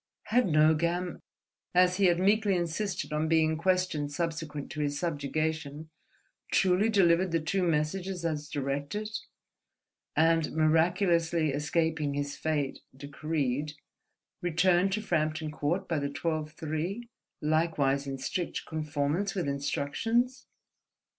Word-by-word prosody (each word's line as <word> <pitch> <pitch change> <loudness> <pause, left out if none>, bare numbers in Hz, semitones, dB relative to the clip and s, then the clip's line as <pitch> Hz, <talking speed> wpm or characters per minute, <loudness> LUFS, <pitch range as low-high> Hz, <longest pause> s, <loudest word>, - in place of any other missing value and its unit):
Had 240 +2 +2
Nogam, 170 +3 +2 0.6
as 180 0 +5
he 200 - +3
had 175 -1 +4
meekly 205 +1 +3
insisted 175 0 -2
on 155 +1 0
being 160 -1 +3
questioned 170 -4 0
subsequent 160 -2 -4
to - - -6
his 145 -1 -1
subjugation, 155 0 -2 0.6
truly 190 +3 +3
delivered 185 -3 +4
the 165 - +2
two 175 +5 -1
messages 175 +2 -1
as 150 -2 -2
directed 145 +9 -3 1.0
and, 165 0 +3
miraculously 165 0 +2
escaping 150 0 0
his 145 0 -2
fate 150 -4 -1 0.2
decreed, 145 0 -2 0.7
returned 175 +2 +3
to 215 +1 -1
Frampton 155 -4 -1
Court 155 +5 -1
by 160 -3 0
the 140 0 -2
twelve 155 +1 -3
three, 165 +9 -4 0.3
likewise 150 -3 +1
in 135 0 -3
strict 170 +6 -3
conformance 155 +5 -1
with 180 -6 -1
instructions? 225 - -1
160 Hz, 115 wpm, -29 LUFS, 150-180 Hz, 1.0 s, as